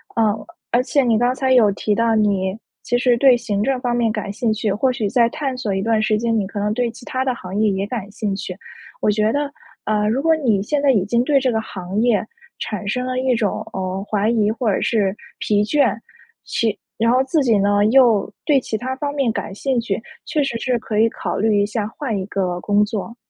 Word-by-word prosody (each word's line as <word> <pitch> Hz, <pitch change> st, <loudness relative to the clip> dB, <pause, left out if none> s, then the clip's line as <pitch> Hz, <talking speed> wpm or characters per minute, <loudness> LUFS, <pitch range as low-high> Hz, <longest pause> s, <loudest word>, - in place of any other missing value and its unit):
嗯， 220 Hz, -2 st, +1 dB, 0.3 s
而 245 Hz, +1 st, +3 dB
且 280 Hz, +1 st, +2 dB
你 230 Hz, -3 st, +3 dB
刚 245 Hz, +2 st, +2 dB
才 260 Hz, 0 st, +1 dB
有 220 Hz, -5 st, +5 dB
提 205 Hz, +1 st, -1 dB
到 230 Hz, -1 st, +2 dB
你 200 Hz, -2 st, +1 dB, 0.3 s
其 245 Hz, -, +1 dB
实 245 Hz, -1 st, +3 dB
对 255 Hz, -1 st, +6 dB
行 205 Hz, -3 st, -2 dB
政 265 Hz, +1 st, 0 dB
方 245 Hz, -1 st, -1 dB
面 230 Hz, -2 st, +1 dB
感 210 Hz, -2 st, -4 dB
兴 230 Hz, +1 st, -1 dB
趣， 215 Hz, -1 st, -1 dB
或 255 Hz, +5 st, +1 dB
许 235 Hz, -5 st, -2 dB
再 235 Hz, 0 st, +3 dB
探 275 Hz, -3 st, -3 dB
索 210 Hz, -6 st, -2 dB
一 195 Hz, -, -1 dB
段 225 Hz, 0 st, +1 dB
时 215 Hz, 0 st, +2 dB
间， 230 Hz, 0 st, 0 dB
你 200 Hz, -, 0 dB
可 205 Hz, -, -5 dB
能 210 Hz, +1 st, 0 dB
对 245 Hz, 0 st, 0 dB
其 240 Hz, +1 st, -14 dB
他 260 Hz, 0 st, -2 dB
的 260 Hz, -1 st, 0 dB
行 185 Hz, 0 st, -7 dB
业 215 Hz, -1 st, +3 dB
也 195 Hz, 0 st, -1 dB
感 210 Hz, -4 st, -5 dB
兴 210 Hz, -2 st, -2 dB
趣。 185 Hz, -1 st, -5 dB, 0.4 s
我 -, -, +1 dB
觉 215 Hz, +1 st, +2 dB
得， 285 Hz, +1 st, -1 dB, 0.3 s
呃， 210 Hz, 0 st, +1 dB
如 260 Hz, +5 st, 0 dB
果 325 Hz, 0 st, +3 dB
你 230 Hz, -10 st, +1 dB
现 285 Hz, +7 st, -1 dB
在 280 Hz, -, +4 dB
已 200 Hz, -7 st, +2 dB
经 235 Hz, +3 st, +1 dB
对 285 Hz, 0 st, +3 dB
这 260 Hz, -1 st, +1 dB
个 220 Hz, -1 st, 0 dB
行 190 Hz, 0 st, -4 dB
业 235 Hz, -3 st, +2 dB, 0.3 s
产 210 Hz, -1 st, -4 dB
生 250 Hz, +4 st, -1 dB
了 255 Hz, 0 st, -2 dB
一 260 Hz, -1 st, +1 dB
种， 210 Hz, -3 st, -1 dB
嗯， 190 Hz, 0 st, -3 dB
怀 210 Hz, +1 st, 0 dB
疑 215 Hz, -3 st, +2 dB
或 225 Hz, -1 st, 0 dB
者 -, -, -1 dB
是 205 Hz, -4 st, +1 dB, 0.2 s
疲 205 Hz, -1 st, +1 dB
倦， 285 Hz, +7 st, +2 dB, 0.5 s
其 225 Hz, -3 st, -1 dB, 0.2 s
然 230 Hz, +2 st, +2 dB
后 255 Hz, +1 st, +3 dB
自 290 Hz, +3 st, +1 dB
己 230 Hz, -6 st, +3 dB
呢， 205 Hz, +1 st, +3 dB
又 225 Hz, -4 st, +4 dB
对 285 Hz, -4 st, +4 dB
其 225 Hz, -, -3 dB
他 260 Hz, +3 st, -4 dB
方 285 Hz, -1 st, -3 dB
面 270 Hz, -5 st, +1 dB
感 200 Hz, -2 st, -4 dB
兴 260 Hz, +1 st, 0 dB
趣， 220 Hz, -3 st, -2 dB, 0.2 s
确 300 Hz, -2 st, 0 dB
实 240 Hz, -4 st, -2 dB
是 250 Hz, -2 st, 0 dB
可 215 Hz, -1 st, -2 dB
以 225 Hz, -, +5 dB
考 -, -, -4 dB
虑 210 Hz, 0 st, +2 dB
一 -, -, +2 dB
下 210 Hz, 0 st, -2 dB
换 230 Hz, -3 st, -4 dB
一 190 Hz, -, -3 dB
个 185 Hz, -3 st, -2 dB
工 205 Hz, 0 st, +3 dB
作。 215 Hz, +2 st, -4 dB
225 Hz, 260 characters per minute, -20 LUFS, 205-250 Hz, 0.5 s, 对